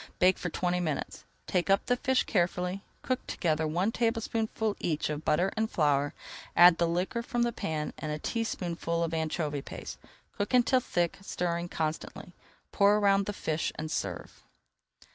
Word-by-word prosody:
Bake 185 +1 +4
for 180 - -2
twenty 180 +1 0
minutes. 160 -5 -3 0.2
Take 180 0 0
up 195 0 +3
the 245 - +2
fish 260 +1 +1
carefully. 180 0 0 0.2
Cook 255 -1 -2
together 160 -2 0
one 180 +7 +1
tablespoonful 225 -2 -1
each 155 -2 -1
of 150 +1 -4
butter 175 +6 +2
and 220 0 0
flour, 145 -2 +1 0.4
add 175 -1 +8
the 170 - +3
liquor 180 +7 -1
from 240 0 -1
the 240 - +1
pan 155 -8 -3
and 155 - -3
a 150 - -2
teaspoonful 170 -4 -2
of 165 0 -2
anchovy 155 -2 -1
paste. - - -8 0.4
Cook 205 +5 0
until 250 +1 +4
thick, 175 -7 -1
stirring 175 -2 -2
constantly, 160 +2 -4 0.4
pour 205 +1 +4
around 200 -1 +3
the - - 0
fish, 160 -5 -2
and 155 0 -5
serve. - - -4
180 Hz, 160 wpm, -29 LUFS, 160-210 Hz, 0.4 s, add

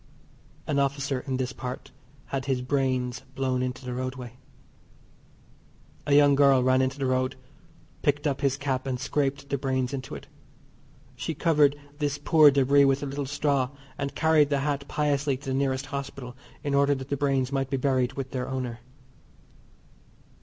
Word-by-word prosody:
An 145 -2 0
officer 140 -1 0
in 130 -1 -1
this 130 +1 -2
part 125 -1 -7 0.4
had 135 -2 -1
his 130 -2 -1
brains 130 -2 0 0.2
blown 130 -1 0
into 125 0 -4
the 125 - -4
roadway. 130 -1 -5 1.7
A 145 - +4
young 145 -1 +6
girl 140 -2 +5
ran 130 0 +4
into 130 +1 -1
the 140 - -2
road 130 0 0 0.7
picked 145 0 +1
up 140 -3 0
his 135 -1 +1
cap 135 -2 -2
and 125 -2 -2
scraped 140 +1 -1
the 140 - -1
brains 130 -1 -1
into 130 -2 -5
it. - - -9 0.9
She 160 - -4
covered 150 -4 +3 0.2
this 145 -1 -1
poor 155 0 +6
debris 140 +1 +4
with 135 +1 +2
a - - -1
little 140 0 -4
straw, 140 -2 0 0.3
and 140 0 -4
carried 160 -3 +4
the 140 -2 +1
hat 140 -1 -2
piously 145 -2 0
to 135 0 -8
the - - 0
nearest 135 0 0
hospital 135 -3 -6 0.3
in 145 - -1
order 140 0 +3
that 130 0 -7
the 140 - 0
brains 135 -2 0
might 135 -1 -1
be 135 - 0
buried 130 -2 +1
with 135 -1 -5
their 125 -1 -3
owner. 125 -3 -4
135 Hz, 170 wpm, -27 LUFS, 130-140 Hz, 1.7 s, young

